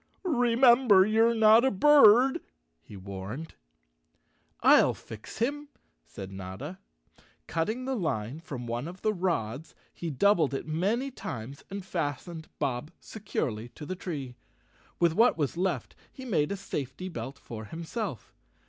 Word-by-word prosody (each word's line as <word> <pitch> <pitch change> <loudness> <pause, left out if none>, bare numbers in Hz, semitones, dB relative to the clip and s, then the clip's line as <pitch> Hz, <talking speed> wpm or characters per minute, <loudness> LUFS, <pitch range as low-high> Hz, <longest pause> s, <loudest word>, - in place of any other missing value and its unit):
"Remember 240 - +5
you're 225 +2 +3
not 220 +1 +6
a 265 - +4
bird," 265 +1 +6 0.4
he 100 - -12
warned. 100 +10 -7 1.1
"I'll - - +6
fix 110 -1 -11
him," 285 +5 -2 0.3
said 95 +8 -9
Notta. 95 - -7 0.7
Cutting 220 +10 -2
the 265 0 -1
line 140 - -2
from 130 -6 -7
one 120 +4 -3
of 180 +2 -10
the 215 - +2
rods 160 - -2 0.2
he 170 - -5
doubled 160 -1 +2
it - - -4
many 205 - -1
times 130 - -7
and 195 -1 -6
fastened 165 -1 -4
Bob 135 0 -2
securely 120 - -4
to 150 - -8
the 185 - -4
tree. 145 -9 -5 0.7
With 170 -2 +3
what 230 +4 +4
was 145 -2 -1
left, 185 +2 -2 0.2
he 260 - -10
made 170 -10 0
a 200 - -2
safety 145 -1 -5
belt 130 -5 -6
for 110 -2 -8
himself. 170 - -6
170 Hz, 140 wpm, -28 LUFS, 130-220 Hz, 1.1 s, not